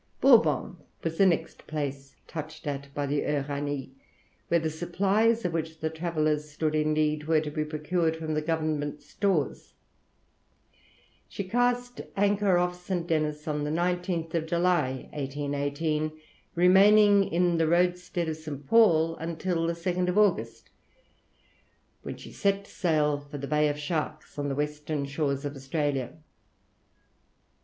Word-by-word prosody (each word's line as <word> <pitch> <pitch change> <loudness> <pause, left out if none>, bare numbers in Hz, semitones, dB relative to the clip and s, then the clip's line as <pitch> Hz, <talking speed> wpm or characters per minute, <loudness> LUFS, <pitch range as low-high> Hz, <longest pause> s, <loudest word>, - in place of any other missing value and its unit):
Bourbon 180 - +4 0.3
was 165 0 -3
the 195 - +7
next 165 -2 -1
place 140 -3 -4
touched 155 -1 -7
at 140 -1 -4
by 145 - -1
the 145 +1 0
Uranie, 145 -1 -2 0.6
where 170 - +3
the 160 -1 -2
supplies 200 +7 +1
of 175 - -1
which 160 -1 -3
the 160 0 -2
travellers 155 -2 -1
stood 155 +1 -1
in 155 0 +1
need 150 0 0
were 160 0 +3
to 150 -1 -4
be 155 +1 -1
procured 160 +2 -1
from 160 -1 -3
the 155 - 0
government 155 -2 -2
stores. 185 -9 -1 1.5
She 200 - -4
cast 245 +4 0 0.2
anchor 200 -2 +3
off 180 0 -1
St. 180 -2 -2
Denis 155 -2 -1
on 150 -1 -1
the 150 - -2
19th 170 -1 -1
July, 170 -7 +1
1818, 145 +2 -2 0.4
remaining 200 +3 +6
in 175 0 +2
the 165 - +3
roadstead 175 0 +1
of 155 -1 -3
St. 150 -3 -7
Paul 165 -6 +4
until 165 +1 -2
the 170 - 0
2nd 180 +2 -1
August, 210 -4 +1 1.3
when - - -6
she - - -11
set 200 0 0
sail 155 -7 +1
for 145 0 -9
the 140 - -5
Bay 150 +1 +2
of 145 - -2
Sharks, 155 0 -4
on 145 0 -1
the 135 - -2
western 150 0 -2
shores 140 0 -2
of 145 0 -4
Australia. 135 -2 -2
160 Hz, 140 wpm, -28 LUFS, 150-180 Hz, 1.5 s, the